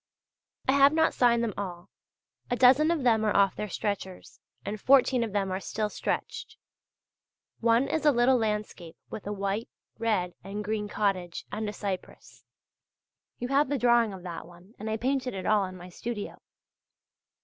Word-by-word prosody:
I - - +5
have 280 +1 +6
not 320 0 +3
signed 235 -1 +3
them 225 -3 -1
all; 175 -3 -6 0.6
a 245 - +1
dozen 260 +5 +5
of 335 -5 0
them 225 -3 +3
are 215 - +1
off 200 -1 +4
their 210 - -4
stretchers, 190 -1 -4 0.3
and 205 0 -4
fourteen 260 -2 +4
of 225 - -4
them 195 -1 -1
are 185 - -1
still 210 +2 -3
stretched. - - -4 1.0
One 235 +3 +3
is 315 +1 -1
a 300 - +6
little 250 0 +4
landscape 210 -7 -3
with 205 - -7
a - - -2
white, 200 +2 -2 0.3
red 210 -6 0
and 200 +2 -5
green 210 0 -2
cottage, 195 -5 -2
and 215 0 -3
a - - -6
cypress. 195 -2 -6 0.9
You 245 - -4
have 280 +1 +3
the 285 - 0
drawing 235 -3 +3
of 190 -2 -9
that 170 -2 -7
one, 175 +4 -17
and 215 +1 -4
I 220 - -1
painted 255 -1 -1
it 185 -1 -5
all 210 -2 +3
in 185 0 -8
my 180 0 -10
studio. 220 +3 -6
215 Hz, 175 wpm, -28 LUFS, 195-245 Hz, 1.0 s, have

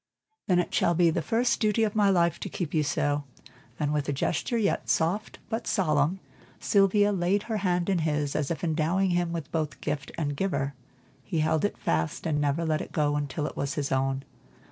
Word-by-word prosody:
"Then 180 - +3
it 175 - 0
shall 170 - +2
be 170 -1 +4
the 165 - -1
first 235 +6 +1
duty 215 +1 +2
of 210 -2 0
my 205 -2 +3
life 170 -3 +2
to - - -5
keep 175 -5 -4
you 155 - +3
so," 145 0 0 0.6
and 150 -1 0
with 145 -1 -1
a - - +2
gesture 165 - -1 0.3
soft 180 +7 0 0.2
yet 225 - -2
solemn, 155 -2 +1 0.4
Sylvia 205 +1 +3
laid 195 +2 +1
her 220 -2 -2
hand 180 -3 0
in 190 -3 +2
his, 150 -3 -1
as 150 -3 0
if 170 - -3
endowing 170 +4 +1
him 175 -1 +1
with 165 -3 -5
both 155 -3 -2
gift 145 -2 -3
and 145 -3 -1
giver. 140 -6 -1 0.5
He 160 +2 -1
held 155 0 +1
it 205 - 0
fast 80 -1 -1
and 150 -2 +1
never 145 +3 0
let 155 -1 0
it - - -8
go 145 -2 +1
until 145 0 -2
it - - -5
was 140 0 -2
his 140 -2 -2
own. 135 0 0
165 Hz, 205 wpm, -27 LUFS, 145-190 Hz, 0.6 s, be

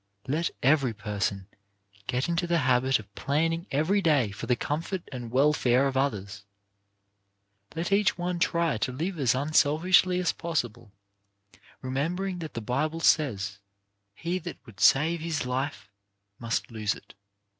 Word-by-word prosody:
Let 160 +5 0
every 135 -4 +3
person 100 -2 -2 0.6
get 125 +2 0
into 170 +1 0
the 170 0 +2
habit 130 +1 +3
of 100 -2 -13
planning 165 - -1
every 160 +9 +1
day 145 - +2
for 100 - -7
the 125 - +3
comfort 165 +8 -3
and 120 -3 -6
welfare 130 -1 +3
of 135 -1 -1
others, 100 -7 -2 1.3
let 170 +3 -2
each 200 0 +3
one 175 0 -2
try 170 -6 +1
to 110 - -1
live 165 +7 -3
as 130 -3 +3
unselfishly 155 +6 +3
as 180 - +1
possible, 120 -9 -3 0.9
remembering 175 +8 -2
that 160 -2 -7
the 115 - -3
Bible 150 +8 -1
says: 105 -12 +2 0.6
"He 175 - -2
that 175 -2 -7
would 110 -6 -15
save 160 - +4
his 160 -4 -2
life, 130 -3 -3 0.5
must 115 +1 -2
lose 110 -2 -1
it. - - -15
140 Hz, 145 wpm, -27 LUFS, 120-170 Hz, 1.3 s, save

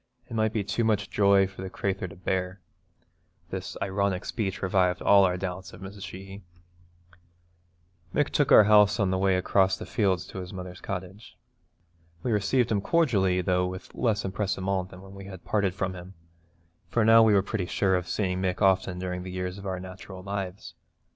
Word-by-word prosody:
It - - -10
might 110 -1 +1
be 110 -3 -1
too 100 +4 -1
much 105 -2 0
joy 100 -1 +4
for 95 0 -9
the 95 - -5
crathur 95 0 -2
to 90 - -11
bear.' 90 0 -2 0.9
This - - -5
ironic 100 -1 -1
speech 100 -5 -3
revived 90 -1 +2
all 100 -1 +6
our 90 -1 0
doubts 95 0 -5
of - - -12
Mrs. 100 +1 -9
Sheehy. 95 +1 -9 1.7
Mick 145 +5 +1
took 145 - +1
our - - +9
house 105 0 +5
on 100 -2 +2
the 95 - 0
way 95 -1 +3
across 95 +1 +2
the - - -7
fields 95 -6 0
to 95 - -8
his 90 -1 -7
mother's 90 -1 -8
cottage. 95 +2 -7 0.9
We 125 - -1
received 110 +4 +1
him 105 -2 +1
cordially, 100 - +2
though 90 0 +1
with 95 +1 -8
less 110 -3 0
empressement 95 -1 -2
than 90 +1 -12
when 95 0 -12
we 100 0 -10
had 95 -2 -10
parted 100 -3 0
from 95 0 -2
him, 90 +1 -10 0.7
for 115 -2 +2
now 115 +1 +8
we 110 -2 +5
were 95 - +4
pretty 95 -3 -3
sure 95 +1 +1
of 90 -1 -2
seeing 95 -3 -1
Mick 90 -1 -1
often 95 -2 +2
during 90 0 -4
the 95 - -7
years 90 +1 -4
of 100 - -7
our 95 -1 -3
natural 95 0 -9
lives. 100 -1 -5
95 Hz, 190 wpm, -27 LUFS, 90-100 Hz, 1.7 s, our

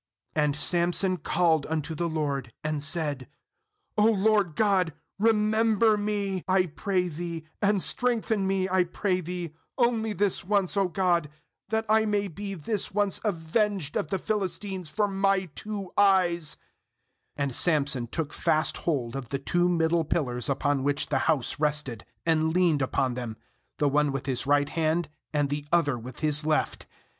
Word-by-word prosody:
28And 150 -2 +2
Samson 175 +4 +2
called 165 -4 +1
unto 160 0 -2
the 170 +2 -2
LORD, 140 -6 -2
and 155 -1 -2
said: 150 -4 -1 0.7
'O 210 - +5
Lord 210 -5 +3
GOD, 190 -6 +2 0.3
remember 220 0 +3
me, 205 -3 -2
I 185 0 +3
pray 180 +3 -1
Thee, 165 0 -5 0.2
and 205 -2 +2
strengthen 225 -5 0
me, 190 -1 +1
I 185 -1 +3
pray 185 +1 -1
Thee, 175 -2 -5 0.2
only 230 -3 +1
this 205 -1 +1
once, 195 -1 +1
0 200 -2 +2
God, 175 -3 +1 0.4
that 220 +1 0
I 220 +1 +4
may 205 -1 0
be 195 +3 -5
this 195 +5 -2
once 205 -1 0
avenged 195 -2 -1
of - - 0
the 190 - -1
Philistines 190 -3 -3
for 210 +6 +1
my 195 -1 +1
two 205 -3 -6
eyes/ 180 -5 +3 0.8
29And 140 -2 -1
Samson 140 -6 +2
took 150 +4 -4
fast 155 0 +1
hold 135 -7 -2
of 135 -4 -5
the 140 - -1
two 175 +6 +1
middle 165 -1 +2
pillars 125 -6 -1
upon 140 0 +1
which 145 +1 0
the 135 - +1
house 145 -5 +1
rested, 150 -7 -1 0.2
and 160 -1 +2
leaned 170 -4 +2
upon 130 -1 0
them, 120 -3 -5 0.4
the 145 - +2
one 145 +1 +2
with 135 -1 -4
his 135 -1 -2
right 145 0 +3
hand, 160 0 0 0.2
and 145 -2 0
the 145 0 -3
other 165 -6 +3
with 120 +3 -9
his 150 -1 +2
left. 155 0 -1
170 Hz, 160 wpm, -27 LUFS, 150-195 Hz, 0.8 s, O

